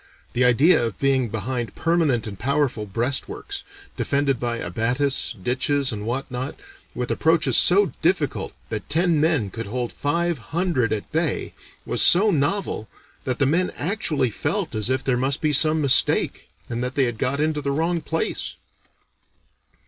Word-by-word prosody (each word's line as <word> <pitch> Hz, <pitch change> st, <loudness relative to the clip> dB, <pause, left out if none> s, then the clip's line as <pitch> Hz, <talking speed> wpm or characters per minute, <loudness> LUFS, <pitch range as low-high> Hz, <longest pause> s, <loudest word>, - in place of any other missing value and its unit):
The 125 Hz, -, +2 dB
idea 125 Hz, +5 st, +5 dB
of 115 Hz, -3 st, -3 dB
being 135 Hz, -3 st, +1 dB
behind 115 Hz, +3 st, -4 dB
permanent 160 Hz, -9 st, +1 dB
and 100 Hz, -3 st, -7 dB
powerful 135 Hz, -5 st, 0 dB
breastworks, 130 Hz, -, -3 dB, 0.3 s
defended 140 Hz, -3 st, 0 dB
by 120 Hz, -1 st, -2 dB
abatis, 120 Hz, +8 st, 0 dB
ditches, 130 Hz, +3 st, +1 dB
and 105 Hz, -1 st, -5 dB
what 130 Hz, +3 st, -3 dB
not, 130 Hz, +2 st, -4 dB, 0.4 s
with -, -, -3 dB
approaches -, -, +2 dB
so 410 Hz, -, +5 dB
difficult -, -, 0 dB, 0.2 s
that -, -, -5 dB
ten 165 Hz, 0 st, +2 dB
men 150 Hz, -, +1 dB
could 115 Hz, +2 st, -6 dB
hold 120 Hz, +2 st, -3 dB
five 170 Hz, +1 st, -1 dB, 0.2 s
hundred 165 Hz, -, +1 dB
at 105 Hz, -2 st, -3 dB
bay, 160 Hz, -3 st, -1 dB, 0.3 s
was -, -, -1 dB
so 205 Hz, +4 st, +6 dB
novel, 145 Hz, -, -1 dB, 0.4 s
that 130 Hz, -1 st, 0 dB
the 140 Hz, -, +3 dB
men 175 Hz, +6 st, +2 dB
actually 155 Hz, -, -1 dB
felt 160 Hz, -, -2 dB
as 110 Hz, +1 st, +1 dB
if 130 Hz, 0 st, 0 dB
there 125 Hz, -2 st, +1 dB
must 130 Hz, +2 st, 0 dB
be 155 Hz, -2 st, 0 dB
some 155 Hz, +2 st, +2 dB
mistake, 140 Hz, -3 st, +3 dB, 0.2 s
and 120 Hz, +1 st, -3 dB
that 125 Hz, +1 st, -3 dB
they 140 Hz, -, +3 dB
had 120 Hz, -3 st, -2 dB
got 140 Hz, +2 st, 0 dB
into 155 Hz, 0 st, 0 dB
the 140 Hz, -, -2 dB
wrong 165 Hz, +4 st, 0 dB
place." 165 Hz, +1 st, -3 dB
135 Hz, 160 wpm, -23 LUFS, 120-155 Hz, 0.4 s, so